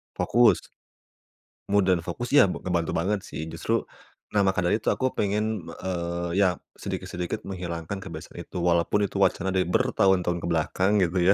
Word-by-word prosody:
Fokus. 120 -1 +4 1.1
Mood, 100 -1 +3
dan 90 -2 +3
fokus 90 +9 -5
ya, 145 - +8
b - - -5
ngebantu 85 -3 -1
banget 100 +5 0
sih, 80 +1 -6
justru - - -1 0.5
nah, 105 - +4
maka 95 -1 +2
dari 90 +4 +2
itu 110 - -1
aku 130 - 0
pengen, 105 +2 0 0.2
eee, 85 -1 -2
iya 95 -3 +3 0.2
sedikit-sedikit 90 +4 -4
menghilangkan 90 -1 -5
kebiasaan - - -9
itu. - - -8
Walaupun 85 +4 +2
itu 100 - -5
wacana 95 0 +2
dari 95 -1 +2
bertahun-tahun 90 -1 +2
ke - - -3
belakang 85 +4 +1
gitu 90 +1 +3
95 Hz, 160 wpm, -26 LUFS, 85-100 Hz, 1.1 s, ya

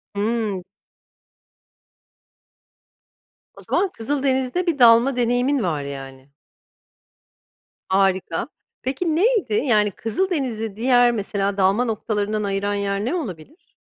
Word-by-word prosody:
Hıı. 210 -2 -1 3.0
O - - -12
zaman 395 - +2
Kızıldeniz'de 270 +4 -1
bir 305 -5 0
dalma 240 +2 +6
deneyimin 245 +2 +1
var, 155 -5 -1
yani. 135 -1 -9 1.6
Harika. 190 -1 +1 0.3
Peki, 305 +5 -1
neydi, 395 - +2
yani, 210 -4 +2
Kızıldeniz'i 230 - -2
diğer 245 +1 +4
mesela 200 -2 -2
dalma 195 +6 +2
noktalarından 215 -1 -2
ayıran 200 +1 -1
yer 200 +1 -2
ne 330 - -1
olabilir? 265 - -8
225 Hz, 95 wpm, -22 LUFS, 200-265 Hz, 3.0 s, dalma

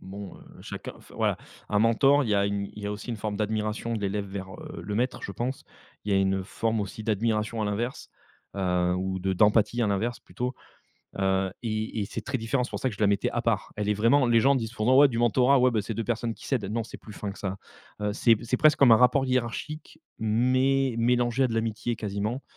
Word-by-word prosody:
bon, 100 0 -9
heu, - - -16 0.2
chacun - - -7
enfin, - - -17
voilà: - - +1 0.3
un 105 - +1
mentor, 135 +6 +4
il 115 - -2
y - - +3
a 100 0 +2
il 100 0 -2
y 100 - -5
a 105 - -2
aussi 105 +3 -8
une 115 - -3
forme 105 -1 -3
d'admiration 110 +2 -2
de 110 - -3
l'élève 100 0 -2
vers, 95 -1 -7
heu, - - -9
le 100 +4 -4
maître, 125 +4 -1
je 100 - -5
pense. 125 +6 -4 0.4
Il 105 - -1
y - - +4
a - - +4
une 95 0 0
forme 110 +2 -1
aussi 100 +2 -5
d'admiration 110 +1 0
à - - 0
l'inverse, 115 +5 -3 0.5
heu, 90 -2 +1
ou 95 +1 -2
de 95 +1 -1
d'empathie 105 +4 +3
à - - +2
l'inverse, 110 +4 -1
plutôt. 125 +1 -4 0.6
Heu, 95 -1 +1
et 110 -1 -2
et 100 - -1
c'est - - -6
très 135 -2 -2
différent. 120 +3 0
C'est - - -7
pour - - -4
ça 130 - +1
que 115 - -6
je 100 - -14
la - - +5
mettais 100 0 +1
à 120 - -1
part. 115 -4 -1
Elle 105 -1 -2
est - - +2
vraiment 115 +6 +3
les 115 -1 +4
gens 140 +4 +4
disent 115 -4 -2
pourtant: 125 +2 +2
«Ouais, 145 0 +8
du 115 -3 -3
mentorat, 125 +3 +4
ouais, 125 0 +4
ben, 110 -3 0
c'est 110 - -4
2 115 - -3
personnes 115 0 -1
qui - - -13
s'aident». 125 -7 0
Non, 115 0 -1
c'est - - -9
plus 110 - -12
fin 105 0 -5
que 100 - -10
ça. 95 -1 -4 0.4
Heu, 105 0 -1
c'est 115 +1 +5
p 110 - -10
c'est 125 +2 0
presque 155 +1 +4
comme 130 -4 +7
un - - +9
rapport 125 +3 +4
hiérarchique, 130 +5 -3 0.2
mais 130 +4 +2
mélangé 120 +2 +2
à 130 - +3
de 115 - -4
l'amitié, 115 +1 -1
quasiment. 105 +5 -3
110 Hz, 250 wpm, -27 LUFS, 100-120 Hz, 0.6 s, un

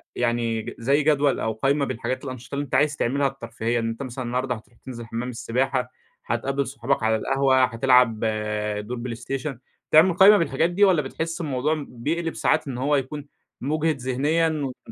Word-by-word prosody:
يعني 115 -2 -1
زي 140 +5 +2
جدول 145 -2 +2
أو 110 0 -1
قايمة 140 +5 +1
بالحاجات 130 +2 -3
الأنشطة 130 +1 -7
اللي 145 - -1
أنت - - -3
عايز 145 0 +3
تعملها 140 +3 +1
الترفيهية؟ 120 -3 -3
إن 115 0 -1
أنت 115 +4 -5
مثلًا 130 0 -5
النهارده 125 +1 -1
هتروح 115 +2 -16
تنزل 120 -3 -7
حمّام 115 +2 -4
السباحة، 125 +2 -1 0.3
هتقابل 135 +4 -1
صحابك 130 -2 -1
على 110 0 +3
القهوة، 135 +2 +2
هتلعب 125 -1 +3 0.7
دور 125 0 -4
بلايستيشن. 125 +3 -5 0.3
بتعمل 165 +4 +6
قايمة 200 +3 +7
بالحاجات 165 -1 +1
دي، 190 +4 +1
والّا 185 -6 +5
بتحس 165 +5 -4
الموضوع 150 +1 -1
بيقلب 160 +7 -3
ساعات 155 -2 +1
إن 125 - -4
هو 145 +3 +1
يكون 145 +2 -3 0.3
مُجهد 155 +2 0
ذهنيًا 145 +6 +1 0.4
و - - -9
135 Hz, 170 wpm, -24 LUFS, 120-150 Hz, 0.7 s, قايمة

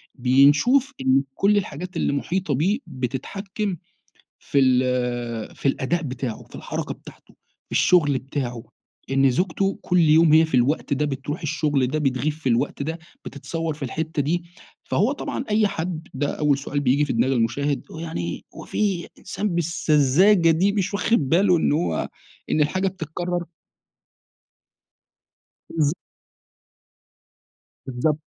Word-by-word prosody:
بينشوف 145 - +4
إنّه 130 +1 +3
كل 205 +1 +3
الحاجات 180 -1 -4
اللي - - +1
المحيطة 160 +4 -1
بيه 190 - +1
بتتحكم 190 - -4 0.6
في 140 - -1
ال 125 -3 0
في - - -4
الأداء 165 +6 0
بتاعه 130 -5 -5
في - - -13
الحركة - - -4
بتاعته - - -16 0.3
في - - -14
الشغل 150 -7 +4
بتاعه، 130 -4 -4 0.5
إن 135 0 +4
زوجته 185 +7 0
كل 180 - +1
يوم 160 0 +5
هي 160 +1 +7
في 160 - -6
الوقت 140 +5 +1
ده 145 +2 +1
بتروح 145 +3 -4
الشغل 145 -3 0
ده 155 - -1
بتغيب 135 0 0
في 155 -2 -4
الوقت 120 +3 0
ده 160 +4 -3 0.3
بتتصور 165 +3 -4
في 150 - -13
الحتّة 155 +4 -2
دي، 170 +5 -1 0.4
فهو 215 +9 +1
طبعًا 285 - -4
أي 210 0 +3
حد 165 -3 -4
ده 140 +2 -1
أوّل 150 -2 +2
سؤال 140 +1 -3
بييجي 140 +2 +2
في 145 - -2
دماغ 120 +3 +1
المشاهد 135 +4 0
"هو - - -8
يعني 160 - -4
هو - - -9
في 195 -5 -1
إنسان 205 +3 -3
بالسذاجة 170 +1 +3
دي، 180 +5 +3
مش 200 -1 -1
واخد 200 - +1
باله 180 +4 +4
إن 160 - +1
هو 160 +4 0 0.4
إن 155 - +2
الحاجة 185 +6 +1
بتتكرر؟" 175 0 -4 2.3
بالض 155 -1 +1 1.9
بالضبط، 135 +4 -1
150 Hz, 140 wpm, -23 LUFS, 135-175 Hz, 2.3 s, هي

